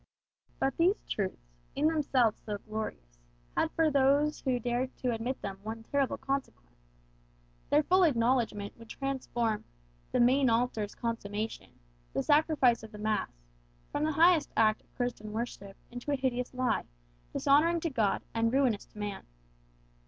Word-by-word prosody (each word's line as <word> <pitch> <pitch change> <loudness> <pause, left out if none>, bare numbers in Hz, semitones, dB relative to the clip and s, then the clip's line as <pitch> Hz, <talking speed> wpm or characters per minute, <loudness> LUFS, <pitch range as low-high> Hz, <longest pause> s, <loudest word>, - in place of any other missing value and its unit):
But 270 -1 0
these 360 +5 +3
truths, 190 - -3 0.3
in 285 - +1
themselves 270 -8 +2
so 210 -1 -3
glorious, 200 - -6 0.4
had - - +2
for 320 -2 +3
those 285 +2 +3
who 260 -3 +1
dared 245 +2 -2
to 250 -2 0
admit 235 +4 -3
them 195 -1 -5
one 220 +2 -6
terrible 275 +3 0
consequence. - - -5 0.8
Their 300 +1 +4
full 370 +5 +4
acknowledgment 235 - +2
would 230 -1 -13
transform 240 -5 -2 0.5
"the - - +1
main 255 +2 +5
altar's 225 -3 0
consummation," 220 -2 -4 0.3
the - - 0
sacrifice 290 -5 +4
of 220 -1 -10
the 210 - -9
mass, 215 0 0 0.6
from 295 - -1
the 310 0 +1
highest 330 +1 +5
act 220 -1 +4
of - - -33
Christian 240 -4 -3
worship 200 -4 -5
into 245 +4 -4
a - - +3
hideous 250 -2 -1
lie, 255 -1 0 0.5
dishonouring 315 - +3
to 330 - -1
God, 220 -6 +1
and 230 0 +1
ruinous 255 -6 +2
to - - -20
man. 205 -1 -5
245 Hz, 150 wpm, -31 LUFS, 215-275 Hz, 0.8 s, main